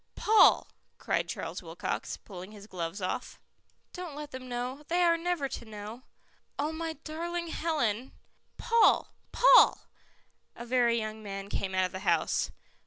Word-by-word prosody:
"Paul," 435 +1 +5 0.3
cried - - -1
Charles - - -5
Wilcox, - - -4
pulling 185 +1 -10
his 205 -1 -11
gloves 185 0 -5
off. 185 - -3 0.5
"Don't 360 -5 -6
let 295 0 -7
them 255 0 -8
know. 250 +3 -4
They 350 +1 +2
are 340 -1 +5
never 335 -4 -1
to - - -6
know." 215 +2 -8 0.6
"Oh, 295 +2 -1
my 325 0 -3
darling 340 +2 -4
Helen 265 -8 -1 0.2
" - - -43
"Paul! 465 -1 +3 0.2
Paul!" - - +6 0.7
A 235 - -8
very 240 -1 +3
young 215 -1 -4
man 195 -1 -6
came 190 -2 -2
out 185 0 +3
of 185 - -4
the 185 - -5
house. 190 - +1
250 Hz, 155 wpm, -30 LUFS, 205-330 Hz, 0.7 s, Paul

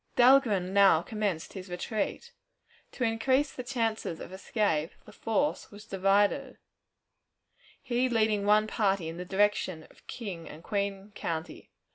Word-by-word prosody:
Dahlgren 240 -8 +4
now 195 -5 +6
commenced 205 -7 -3
his 190 -1 -8
retreat. 215 - -3 0.6
To 255 - -3
increase 260 +5 +1
the - - -5
chances 225 -9 -2
of 185 - -9
escape, 190 -5 -1
the - - -13
force 280 +6 -1
was 205 0 -13
divided, 195 0 +1 1.3
he 250 +1 +1
leading 215 -3 +1
one 210 +1 +5
party 195 -5 0
in 165 - -7
the 180 - -5
direction 190 -4 +1
of - - -24
King 190 -8 -6
and 155 +2 -11
Queen 200 0 -3
County. 160 -5 -5
205 Hz, 135 wpm, -29 LUFS, 185-225 Hz, 1.3 s, now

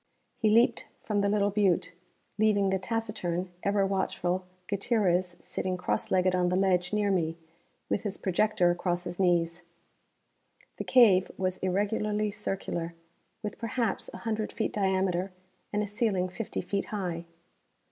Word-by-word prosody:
He 220 - +3
leaped 230 +3 +3 0.2
from 205 -2 0
the 200 - +2
little 205 0 +2
butte, 185 -3 +2 0.5
leaving 205 -3 +3
the 190 - +1
taciturn 185 -4 -2
ever 200 0 +2
watchful 185 -1 -1 0.2
Gutierrez 185 -4 +1
sitting 185 -1 -3
cross 180 - -1
legged 185 0 +3
on 180 -1 +2
the 180 - +1
ledge 185 -2 +2
near 210 -1 +1
me, 165 -3 0 0.5
with - - 0
his 200 -2 -3
projector 185 -1 +2
across 175 0 -1
his 175 0 -6
knees. 175 -2 +2 1.2
The - - -4
cave 215 -8 +6
was 185 -1 -1
irregularly 210 +2 0
circular, 190 -5 -3 0.5
with 210 - -5
perhaps, 230 0 -1
a - - -8
hundred 220 -2 -2
feet 220 - -2
diameter 190 -2 0 0.4
and 210 0 0
a - - -3
ceiling 205 -4 0
fifty 210 +4 -4
feet 195 +2 -2
high. 175 -5 -3
190 Hz, 145 wpm, -29 LUFS, 180-210 Hz, 1.2 s, cave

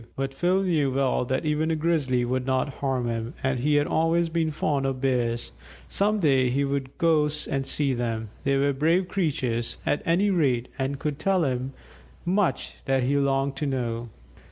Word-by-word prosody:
But 135 0 -3
Phil 180 +6 +1
knew 155 -7 +1
well 135 -2 +1
that 130 +4 -1
even 155 +1 +1
a 165 - +1
Grizzly 150 -6 +1
would 130 +1 -1
not 130 +2 +1
harm 130 -3 -1
him, 115 0 -3
and 130 -1 0
he 145 +4 +2
had 145 0 +3
always 165 +2 +1
been 160 -1 0
fond 145 -2 0
of 135 -1 -2
Bears. 120 -3 0 0.4
Some 210 +2 +1
day 135 -7 +3
he 140 +3 +1
would 140 -1 -3
go 155 -3 +3 0.2
and 135 -1 -2
see 140 -2 0
them; 115 -3 -2
they 135 0 +2
were 140 +1 +2
brave 165 +7 +2
creatures, 130 - -1
at 145 - +1
any 190 +5 +2
rate, 130 -9 +1
and 135 +1 -1
could 150 +1 -3
tell 190 0 +2
him 130 -1 -2 0.5
much 185 +1 0
that 135 -1 +1
he 135 +3 +1
longed 135 0 +1
to 150 - -1
know. 120 -3 -2
140 Hz, 185 wpm, -26 LUFS, 130-160 Hz, 0.5 s, had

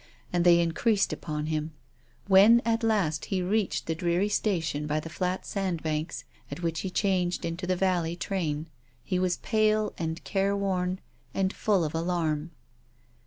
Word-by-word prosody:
And 175 -1 +2
they 175 -1 +6
increased 195 +5 +1
upon 150 -1 -4
him. 155 0 -2 0.5
When 200 +4 +7
at 230 0 +1
last 200 -9 +1
he 185 -2 -1
reached 205 +2 0
the 165 - -1
dreary 175 +4 0
station 165 -8 0
by 150 +1 0
the 160 +1 -8
flat 180 +2 -2
sandbanks, 165 -5 -2 0.3
at 175 - -7
which 165 -1 -1
he 190 - -3
changed 180 -2 0
into 170 +2 -4
the 185 - +2
vallej 175 -3 +1
train, 165 -5 -2 0.4
he 185 -2 -1
was 180 -1 +1
pale 215 -1 +1
and 165 0 -3
careworn, 195 -2 0 0.3
and 190 0 +1
full 200 -5 +1
of 155 0 -2
alarm. 165 -2 -1
180 Hz, 155 wpm, -28 LUFS, 165-195 Hz, 0.5 s, When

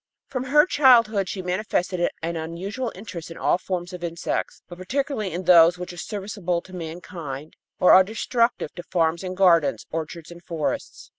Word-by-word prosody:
From 255 -1 -3
her 295 +3 +5
childhood 230 - +4
she 190 - -4
manifested 180 -1 -1
an 170 +1 -2
unusual 185 +10 -4
interest 185 -4 -8
in 165 - -9
all 175 - +1
forms 180 -1 -4
of 180 -1 -8
insects, 170 0 -3
but 175 0 -11
particularly 235 0 -2
in 180 +3 -4
those 175 -1 +6
which 180 0 -7
are - - -12
serviceable 195 -3 -3
to 185 - -15
mankind 160 -4 -7 0.2
or 180 - +6
are 190 - +9
destructive 230 -2 -1
to 175 - -7
farms 170 -1 0
and 185 0 -5
gardens, 170 -6 +3
orchards 165 +1 -5
and 170 0 -12
forests. 160 -4 -4
180 Hz, 170 wpm, -24 LUFS, 170-205 Hz, 0.2 s, are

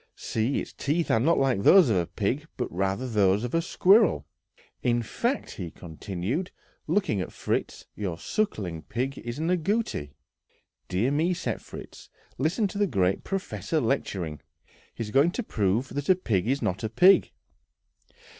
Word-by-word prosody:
See, 115 +5 -1
its - - -7
teeth 160 +4 -1
are 115 - +4
not 160 +8 +3
like 130 -7 +2
those 180 - +7
of 110 - +2
a 85 -2 0
pig, 135 +9 -2
but 125 - -3
rather 95 +7 -1
those 105 -2 +2
of 120 - -4
a 165 - +3
squirrel. 195 +5 +4 0.6
In 120 -1 +1
fact," 240 - -2
he 90 -4 -4
continued, 95 - -4 0.4
looking 115 - +1
at - - -5
Fritz, - - -3
"your 95 -6 -3
sucking 95 - -2
pig 130 +3 -2
is 120 +1 -6
an 160 +3 0
agouti." 180 - -1 0.7
"Dear 100 +9 0
me," 165 +5 +1
said - - -3
Fritz; - - -11 0.3
"listen 175 - +1
to 200 - -5
the 205 - +3
great 95 - +1
professor 190 -4 -2
lecturing! 90 - -2 0.5
He 115 - -3
is 105 - -7
going 140 +7 +4
to 245 - -2
prove 110 - 0
that 145 +3 -4
a 185 - +7
pig 110 - -1
is 135 +3 0
not 95 +2 -1
a 110 - -1
pig!" 185 - +5
125 Hz, 165 wpm, -27 LUFS, -, 0.7 s, those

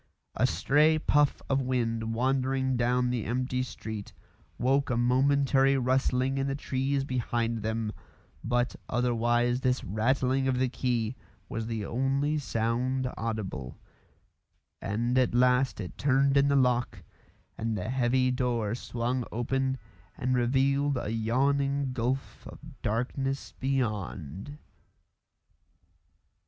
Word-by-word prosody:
A - - +2
stray 150 - +3
puff 145 -2 +2
of 135 0 +1
wind 115 -3 -1
wandering 130 +1 +1
down 125 +1 +1
the 120 -3 -1
empty 125 +1 -1
street 110 -4 -6 0.4
woke 135 +3 +2
a 120 - +1
momentary 135 +2 +3
rustling 130 +1 +1
in 135 - 0
the 135 - -1
trees 135 0 -1
behind 120 -3 -1
them, 110 0 -2 0.5
but 120 +1 0
otherwise 120 0 +1
this 130 -1 +1
rattling 130 +6 +1
of 130 -1 +1
the 130 0 +1
key 120 -2 -1 0.3
was 110 0 -4
the 110 -3 -3
only 135 +5 0
sound 125 +1 -1
audible; 105 - -4 1.0
and 120 +5 0
at 125 -2 +1
last 125 0 +3
it 90 -4 -7
turned 140 0 +3
in 140 0 +5
the 140 - +3
lock 125 -2 +1 0.5
and 110 -1 -2
the 105 +4 -4
heavy 130 0 +2
door 120 -4 0
swung 125 +1 -2
open 130 +3 -1 0.4
and 130 +1 0
revealed 135 +3 +2
a 110 - -3
yawning 135 +4 +1
gulf 130 +2 -3
of - - -10 0.2
darkness 135 +5 -2
beyond. 110 - -3
125 Hz, 120 wpm, -29 LUFS, 115-135 Hz, 1.0 s, in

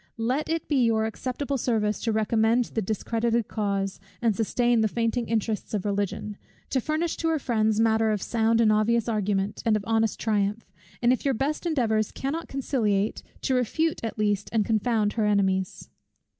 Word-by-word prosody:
Let 255 +7 -1
it 325 -1 -2
be 275 -5 +2
your 220 -1 +2
acceptable 260 +5 -3
service 215 -3 0
to 230 - 0
recommend 220 +2 +2
the 225 - 0
discredited 225 +2 -1
cause, 200 -2 -2 0.2
and 230 -3 +1
sustain 240 +2 +2
the 220 - +3
fainting 230 +2 -1
interests 220 -1 -1
of 200 - -2
Religion, 205 0 -2 0.3
to 260 - +1
furnish 310 +5 -1
to 325 - -1
her 325 -1 +2
friends 220 -5 +1
matter 225 0 +3
of 210 -1 0
sound 225 +2 +1
and 220 -2 +4
obvious 220 +2 +2
argument, 205 -2 -1
and 220 -2 +3
of 205 - -6
honest 225 -1 +1
triumph; 210 0 0 0.4
and 240 +1 +5
if 255 - -3
your 275 -2 +1
best 295 +8 -1
endeavours 220 -9 +1
cannot 300 +5 -4
conciliate, 220 -7 0 0.2
to 265 - 0
refute 285 +6 0
at 225 - -4
least, 205 -1 0
and 220 -3 +1
confound 220 -1 +1
her 220 -2 +1
enemies. 190 -2 0
225 Hz, 175 wpm, -26 LUFS, 210-245 Hz, 0.4 s, and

